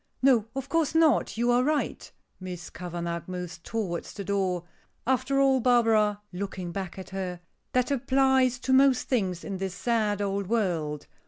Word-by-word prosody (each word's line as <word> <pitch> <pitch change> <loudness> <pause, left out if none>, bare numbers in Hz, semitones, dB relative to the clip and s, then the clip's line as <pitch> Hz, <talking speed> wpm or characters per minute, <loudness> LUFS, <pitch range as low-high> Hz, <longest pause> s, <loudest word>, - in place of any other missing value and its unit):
"No, 245 -5 +4
of 270 0 -4
course 320 +1 0
not. 315 -8 +3
You 240 +1 +2
are 245 +1 +4
right." 300 +1 -1 0.3
Miss 180 -3 -7
Kavanagh 170 -1 -4
moves 180 -2 -6
towards 180 -2 -4
the 200 - -6
door. 190 -3 0 0.4
"After 260 +2 +1
all, 270 -1 +4
Barbara," 225 -4 +3
looking 185 -1 -4
back 190 -1 -5
at 190 - -9
her, 185 -2 -4 0.3
"that 255 +2 +2
applies 265 -1 +3
to 260 - +1
most 265 -1 +4
things 190 -9 0
in 195 - -4
this 190 -1 -3
sad 215 -1 0
old 200 -1 -1
world. 170 -9 -1
210 Hz, 160 wpm, -27 LUFS, 185-260 Hz, 0.4 s, No